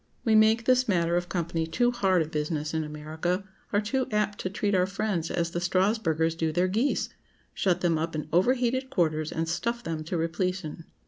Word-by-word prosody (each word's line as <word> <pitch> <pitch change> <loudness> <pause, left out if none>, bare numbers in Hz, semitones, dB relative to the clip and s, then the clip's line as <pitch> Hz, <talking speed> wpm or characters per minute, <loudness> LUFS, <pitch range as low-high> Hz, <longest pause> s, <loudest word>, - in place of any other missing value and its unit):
We 225 - +3
make 220 +1 +5
this 255 0 +4
matter 170 -4 +2
of 175 0 -1
company 170 -2 -1
too 240 +9 +2
hard 190 -8 +2
a - - -7
business 150 0 -2
in 160 0 0
America; 155 +5 -3 0.3
are 205 - +3
too 255 +5 -1
apt 210 -1 0
to 185 - -2
treat 205 +1 -1
our 185 -1 +3
friends 195 -4 -2
as 170 -1 -1
the 175 - -2
Strasburgers 180 -3 +1
do 165 -1 -1
their 175 +4 +2
geese; 225 +9 0 0.4
shut 180 -2 +1
them 170 -3 +2
up 165 0 -2
in 155 - -3
overheated 250 +7 +2
quarters, 155 - 0
and 165 0 -2
stuff 235 +8 -2
them 160 -4 -3
to 170 +2 -2
repletion. 165 0 -2
180 Hz, 195 wpm, -27 LUFS, 160-210 Hz, 0.4 s, make